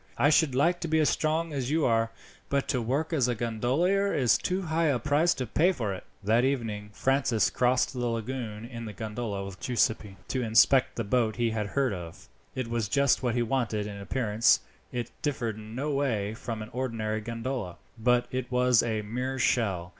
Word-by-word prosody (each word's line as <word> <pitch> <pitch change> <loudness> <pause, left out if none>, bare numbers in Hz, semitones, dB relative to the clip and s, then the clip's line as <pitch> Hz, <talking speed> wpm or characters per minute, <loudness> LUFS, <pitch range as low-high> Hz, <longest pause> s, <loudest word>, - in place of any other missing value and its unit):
I 145 - +4
should 150 -4 +3
like 170 +6 +3
to 170 - -3
be 160 0 +2
as 155 -2 +3
strong 160 +1 0
as 135 -3 -2
you 160 +1 +2
are, 115 -1 +2 0.4
but 140 -1 0
to 125 - +1
work 140 +8 -1
as 135 -6 +2
a 120 - 0
gondolier 135 - +1
is 125 -5 +4
too 185 +1 -1
high 165 0 +1
a 140 -4 +2
price 150 +8 +2
to 130 - -3
pay 165 - +3
for 115 - -2
it." 95 - -7 0.2
That 115 +4 +3
evening, 115 -6 -1
Francis 130 -2 +1
crossed 125 +2 +2
the 125 -2 -2
lagoon 115 -1 -4
in 115 -1 -7
the 105 - -6
gondola 105 -2 -4
with 95 -2 -9
Giuseppi, 110 -5 0
to 130 - -1
inspect 120 +3 +4
the 115 - -2
boat 110 0 +1
he 115 0 0
had 110 -2 -2
heard 130 0 0
of. 85 -3 -8 0.3
It 130 -2 -2
was 115 -3 -2
just 140 +1 +3
what 125 -2 0
he 120 - +2
wanted. 115 -3 -1
In 105 -1 -6
appearance 110 +1 +2 0.3
it 120 -2 -4
differed 125 -8 -1
in 110 +1 -9
no 145 +4 -2
way 115 -8 0
from 115 -2 -5
an 110 - -10
ordinary 115 -4 -2
gondola, 115 -4 -4 0.2
but 120 +1 +2
it 130 -1 -3
was 125 -1 +4
a 110 -2 -2
mere 125 +5 -3
shell. 100 -9 +1
120 Hz, 200 wpm, -28 LUFS, 110-135 Hz, 0.4 s, I